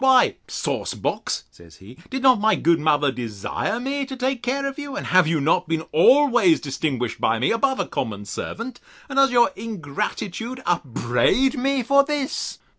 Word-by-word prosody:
Why, 265 Hz, -1 st, +4 dB
sauce -, -, -3 dB
box, -, -, -3 dB
says 85 Hz, -3 st, -17 dB
he, 105 Hz, +6 st, -14 dB
did 265 Hz, 0 st, -4 dB
not 255 Hz, -4 st, +6 dB
my 220 Hz, 0 st, +4 dB
good 165 Hz, 0 st, +2 dB
mother 150 Hz, -2 st, +2 dB
desire 120 Hz, -, -4 dB
me 275 Hz, +3 st, -2 dB
to 265 Hz, -, -6 dB
take 260 Hz, -1 st, -1 dB
care 270 Hz, +3 st, -1 dB
of 275 Hz, +1 st, -4 dB
you? 285 Hz, -2 st, -6 dB
And -, -, -4 dB
have 185 Hz, -2 st, +4 dB
you 160 Hz, -1 st, +1 dB
not 150 Hz, +3 st, +1 dB
been 160 Hz, 0 st, -1 dB
always 240 Hz, -, +5 dB
distinguished 130 Hz, -4 st, -3 dB
by 115 Hz, -, +2 dB
me, 125 Hz, -, +1 dB
above 265 Hz, +3 st, +1 dB
a -, -, 0 dB
common 105 Hz, -4 st, -4 dB
servant? 230 Hz, -, -6 dB, 0.3 s
And 270 Hz, -, -5 dB
does 275 Hz, 0 st, +6 dB
your 240 Hz, -4 st, +4 dB
ingratitude 215 Hz, -, -5 dB
upbraid 155 Hz, -, +1 dB
me 270 Hz, 0 st, 0 dB
for 280 Hz, +3 st, +4 dB
this? 290 Hz, -1 st, -3 dB
225 Hz, 180 wpm, -22 LUFS, -, 0.3 s, not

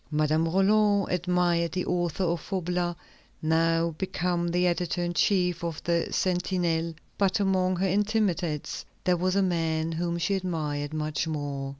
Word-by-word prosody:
Madame 155 Hz, +1 st, +1 dB
Roland 200 Hz, +2 st, +3 dB
admired 175 Hz, -2 st, +1 dB
the 185 Hz, -1 st, -1 dB
author 175 Hz, 0 st, -1 dB
of 170 Hz, -2 st, 0 dB
Faublas, 180 Hz, -2 st, -2 dB, 0.4 s
now 165 Hz, +1 st, +2 dB
become 180 Hz, -2 st, -1 dB
the 180 Hz, +1 st, +1 dB
editor 175 Hz, 0 st, 0 dB
in 175 Hz, 0 st, -2 dB
chief 180 Hz, 0 st, +1 dB
of 165 Hz, -3 st, -3 dB
the 170 Hz, -1 st, +1 dB
Sentinelle; 175 Hz, -3 st, 0 dB, 0.2 s
but 195 Hz, +1 st, +2 dB
among 185 Hz, -2 st, +2 dB
her 190 Hz, +2 st, 0 dB
intimates 190 Hz, -6 st, 0 dB, 0.2 s
there 180 Hz, -1 st, +2 dB
was 185 Hz, +2 st, 0 dB
a 200 Hz, -, +3 dB
man 165 Hz, -3 st, 0 dB
whom 170 Hz, +1 st, -2 dB
she 180 Hz, +4 st, 0 dB
admired 155 Hz, -6 st, -2 dB
much 155 Hz, 0 st, -2 dB
more. 145 Hz, -3 st, -3 dB
175 Hz, 150 wpm, -27 LUFS, 165-185 Hz, 0.4 s, Roland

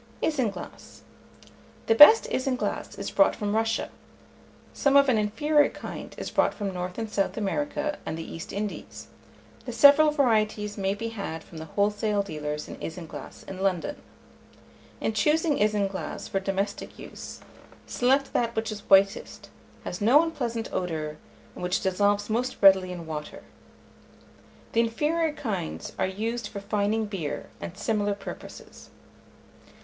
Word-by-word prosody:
ISINGLASS. 255 Hz, -10 st, -3 dB, 0.8 s
The -, -, +4 dB
best 295 Hz, -, +9 dB
isinglass 260 Hz, -1 st, -2 dB
is -, -, -4 dB
brought 295 Hz, -, +4 dB
from 210 Hz, -1 st, -2 dB
Russia; 225 Hz, 0 st, 0 dB, 0.8 s
some 280 Hz, -1 st, +3 dB
of 280 Hz, -1 st, +5 dB
an 230 Hz, -4 st, +3 dB
inferior 295 Hz, +8 st, +2 dB
kind -, -, -8 dB
is -, -, -5 dB
brought -, -, +2 dB
from 200 Hz, -3 st, -3 dB
North 180 Hz, 0 st, -5 dB
and 225 Hz, -1 st, -3 dB
South 200 Hz, -2 st, -1 dB
America 295 Hz, +7 st, -2 dB
and 160 Hz, -, -4 dB
the 165 Hz, -, -5 dB
East 165 Hz, -, -8 dB
Indies: 205 Hz, 0 st, -6 dB, 0.6 s
the -, -, -2 dB
several 285 Hz, +6 st, +7 dB
varieties 215 Hz, -7 st, +1 dB
may 195 Hz, -1 st, -1 dB
be 230 Hz, +2 st, -4 dB
had 200 Hz, -7 st, -5 dB
from 165 Hz, -, -11 dB
the 160 Hz, -, -6 dB
wholesale 205 Hz, +3 st, 0 dB
dealers 150 Hz, -4 st, -5 dB
in -, -, -8 dB
isinglass 160 Hz, -4 st, -8 dB
in 190 Hz, -, -8 dB
London. 195 Hz, -, 0 dB, 1.0 s
In 220 Hz, -, -1 dB
choosing 300 Hz, +7 st, +2 dB
isinglass 205 Hz, -2 st, -1 dB
for 195 Hz, -, -1 dB
domestic 195 Hz, +1 st, -3 dB
use, -, -, -9 dB, 0.4 s
select 270 Hz, +3 st, +1 dB
that 235 Hz, -1 st, 0 dB
which 220 Hz, 0 st, -1 dB
is 210 Hz, -, -5 dB
whitest, 195 Hz, 0 st, +3 dB, 0.3 s
has 180 Hz, -, -5 dB
no 260 Hz, +9 st, +6 dB
unpleasant 245 Hz, -9 st, -3 dB
odour, 155 Hz, -4 st, -3 dB, 0.4 s
and -, -, -10 dB
which 180 Hz, +1 st, 0 dB
dissolves 205 Hz, +2 st, +1 dB
most 245 Hz, +4 st, -1 dB
readily 190 Hz, -2 st, +6 dB
in 175 Hz, -2 st, -7 dB
water. 150 Hz, -2 st, -6 dB, 1.3 s
The 230 Hz, -, +1 dB
inferior 305 Hz, +8 st, 0 dB
kinds 195 Hz, -, -4 dB
are -, -, +2 dB
used 220 Hz, +4 st, -3 dB
for 205 Hz, -, -7 dB
fining 210 Hz, +2 st, 0 dB
beer, 190 Hz, -8 st, -5 dB
and 85 Hz, 0 st, -7 dB
similar 205 Hz, -2 st, 0 dB
purposes. -, -, -10 dB
210 Hz, 145 wpm, -26 LUFS, 190-245 Hz, 1.3 s, best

